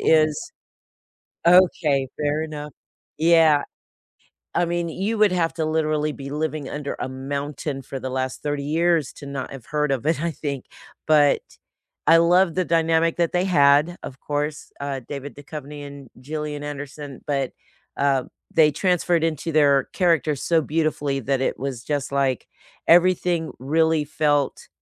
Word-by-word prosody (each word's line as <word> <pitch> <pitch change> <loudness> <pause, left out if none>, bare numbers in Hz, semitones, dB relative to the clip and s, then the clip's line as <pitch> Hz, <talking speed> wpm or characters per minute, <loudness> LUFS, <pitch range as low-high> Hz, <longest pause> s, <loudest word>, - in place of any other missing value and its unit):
is 155 -2 +2 0.9
Okay, 165 -6 +4
fair 150 +1 0
enough. 150 -2 -6 0.5
Yeah. 160 -2 +5 0.9
I 175 - +2
mean, 170 0 -1
you 200 +7 -2
would 210 -1 +5
have 165 -3 0
to 160 -1 -1
literally 155 -1 0
be 140 -1 -8
living 150 -1 -3
under 145 -1 -4
a - - -2
mountain 140 +1 -4
for 135 +1 -7
the 130 - -4
last 130 0 -3
30 145 -1 -2
years 165 0 +1
to 140 - -11
not 140 -2 -5
have 135 -4 -10
heard 150 -2 0
of 130 -1 -2
it, 160 -1 +1
I 170 - 0
think, 140 -3 -5 0.4
but 150 -2 +5 0.7
I 165 0 +7
love 175 +1 +4
the 185 - +1
dynamic 165 0 +2
that 170 -1 +1
they 180 +1 +1
had, 150 0 +4
of 130 - -8
course, 145 0 -3
uh, 140 -1 -3
David 145 0 -7
Duchovny 145 0 -8
and 140 -3 -11
Gillian 150 +1 -5
Anderson, 145 -1 -7
but 135 -3 -1 0.4
uh, 140 -2 +2 0.3
they 155 -2 +5
transferred 175 0 +1
into 165 0 -2
their 140 -3 +4
characters 160 -6 +1
so 165 -2 +2
beautifully 145 -3 -1
that 135 +2 -1
it - - -1
was 130 -3 -4
just 145 -3 -2
like, 135 -3 0 0.4
everything 175 -1 +3
really 160 +3 +2
felt 145 -2 0
150 Hz, 150 wpm, -23 LUFS, 140-165 Hz, 0.9 s, I